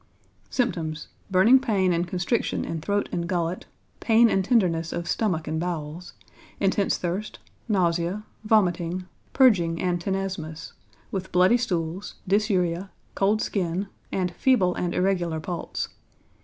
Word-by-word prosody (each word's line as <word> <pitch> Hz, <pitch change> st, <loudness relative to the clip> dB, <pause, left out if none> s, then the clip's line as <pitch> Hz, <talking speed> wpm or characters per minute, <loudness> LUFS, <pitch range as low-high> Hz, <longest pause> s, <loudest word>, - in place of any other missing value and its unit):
Symptoms. 165 Hz, -, -2 dB, 0.2 s
Burning 200 Hz, +8 st, +6 dB
pain 195 Hz, -8 st, +1 dB
and 170 Hz, +1 st, 0 dB
constriction 180 Hz, +6 st, -1 dB
in 165 Hz, -1 st, -4 dB
throat 205 Hz, +4 st, 0 dB
and 170 Hz, -1 st, -2 dB
gullet, 175 Hz, -1 st, -2 dB, 0.3 s
pain 230 Hz, 0 st, +5 dB
and 195 Hz, -, +2 dB
tenderness 180 Hz, -7 st, +2 dB
of 170 Hz, 0 st, -4 dB
stomach 180 Hz, -8 st, 0 dB
and 160 Hz, +1 st, -1 dB
bowels, 170 Hz, 0 st, -4 dB, 0.5 s
intense 195 Hz, 0 st, +1 dB
thirst, 185 Hz, +5 st, -3 dB, 0.3 s
nausea, 175 Hz, 0 st, +1 dB, 0.2 s
vomiting, 185 Hz, -4 st, +1 dB, 0.3 s
purging 180 Hz, -11 st, +4 dB
and 175 Hz, -2 st, 0 dB
tenesmus, 185 Hz, -4 st, -4 dB, 0.4 s
with 190 Hz, -1 st, -4 dB
bloody 185 Hz, +6 st, +5 dB
stools, 180 Hz, -5 st, -3 dB
dysuria, 190 Hz, -3 st, +1 dB, 0.2 s
cold 205 Hz, +2 st, +2 dB
skin, 190 Hz, 0 st, -2 dB, 0.2 s
and 180 Hz, -2 st, -1 dB
feeble 190 Hz, -6 st, +3 dB
and 175 Hz, -1 st, -2 dB
irregular 175 Hz, -4 st, +1 dB
pulse. 170 Hz, +1 st, -4 dB
180 Hz, 125 wpm, -25 LUFS, 170-200 Hz, 0.5 s, Burning